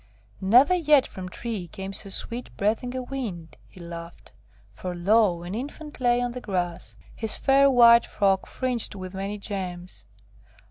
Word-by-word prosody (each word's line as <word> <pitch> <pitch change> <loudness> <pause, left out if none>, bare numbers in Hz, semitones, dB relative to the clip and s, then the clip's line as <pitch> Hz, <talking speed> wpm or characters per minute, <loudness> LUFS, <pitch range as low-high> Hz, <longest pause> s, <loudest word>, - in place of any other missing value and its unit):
'Never 245 - +5
yet 300 -6 +4
from 185 -1 -8
tree 215 -3 -4
came 190 +4 -7
so 195 0 -4
sweet 235 +5 -1
breathing 230 +5 -1
a 255 - -3
wind,' 225 -12 -6
he - - -17
laughed; 170 0 -10 0.4
for 180 -1 -6
lo! 185 -1 +2
an 175 +2 -6
infant 290 +6 -7
lay 240 -1 +3
on 245 0 -1
the 250 +1 -7
grass, 175 -5 -4 0.2
his 220 -1 0
fair 275 0 +4
white 235 -2 +6
frock 195 -2 +1
fringed 250 -5 -2
with 185 -1 -7
many 195 +2 -4
gems. 185 -3 -5
210 Hz, 155 wpm, -25 LUFS, 185-245 Hz, 0.4 s, white